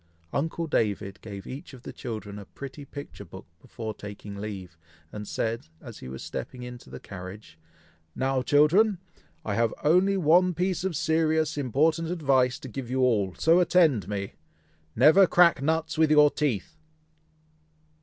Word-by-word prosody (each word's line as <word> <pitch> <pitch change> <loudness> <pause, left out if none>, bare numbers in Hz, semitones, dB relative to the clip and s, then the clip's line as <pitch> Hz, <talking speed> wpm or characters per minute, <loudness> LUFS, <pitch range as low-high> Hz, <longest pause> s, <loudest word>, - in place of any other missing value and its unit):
Uncle 165 +3 -1
David 105 -9 -1
gave 100 -3 -8
each 140 +2 -8
of 125 - -16
the - - -8
children 105 -3 -6
a 100 - -10
pretty 140 +4 -9
picture 140 -7 -9
book 95 0 -12 0.2
before 110 -2 -6
taking 105 0 -9
leave, 100 -4 -7 0.4
and 105 -1 -7
said, 115 -4 -3
as - - -11
he - - -9
was 65 0 -7
stepping 125 -1 -6
into 125 0 -10
the - - -8
carriage, 90 -2 -10 0.6
"Now, 130 0 0
children! 170 - +4 0.5
I 105 - -1
have 115 +1 +1
only 185 +6 +4
one 180 +1 +4
piece 180 +1 -1
of 190 -3 -2
serious, 160 0 +1
important 155 +5 +1
advice 135 -7 +2
to - - -7
give 125 0 -6
you 130 +1 0
all, 105 -8 +2
so 165 +2 +4
attend 170 - +4
to 95 - -12
me! 100 -1 -4 0.6
never 160 - +6
crack 170 -5 +5
nuts 160 +2 -1
with 160 -1 +4
your 150 -1 +6
teeth!" 145 - -2
135 Hz, 160 wpm, -27 LUFS, 105-160 Hz, 0.6 s, never